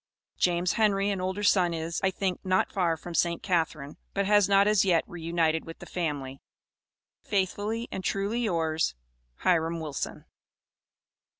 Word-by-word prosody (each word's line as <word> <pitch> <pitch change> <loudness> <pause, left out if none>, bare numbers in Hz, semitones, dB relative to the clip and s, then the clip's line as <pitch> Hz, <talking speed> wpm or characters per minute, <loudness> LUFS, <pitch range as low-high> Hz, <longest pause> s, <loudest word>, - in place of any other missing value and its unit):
James 175 0 +2
Henry, 205 -2 +2
an 195 -2 -2
older 190 +3 -2
son 180 -4 +3
is, 165 +1 -3
I 190 - +4
think, 185 0 -2
not 185 0 +1
far 170 -4 +1
from 175 +2 -8
St. 170 0 +1
Catharine, 160 -6 -1 0.2
but 200 0 +1
has 205 -1 +4
not 200 0 +5
as 210 -2 +4
yet 175 -4 +3
reunited 165 -1 0
with 165 - -9
the - - -11
family. 145 -6 -4 0.8
Faithfully 205 +4 -1
and 190 - -4
truly 200 +5 -1
yours, 165 - 0 0.5
HIRAM 165 -2 +2
WILSON. 150 -3 -5
180 Hz, 145 wpm, -28 LUFS, 165-200 Hz, 0.8 s, not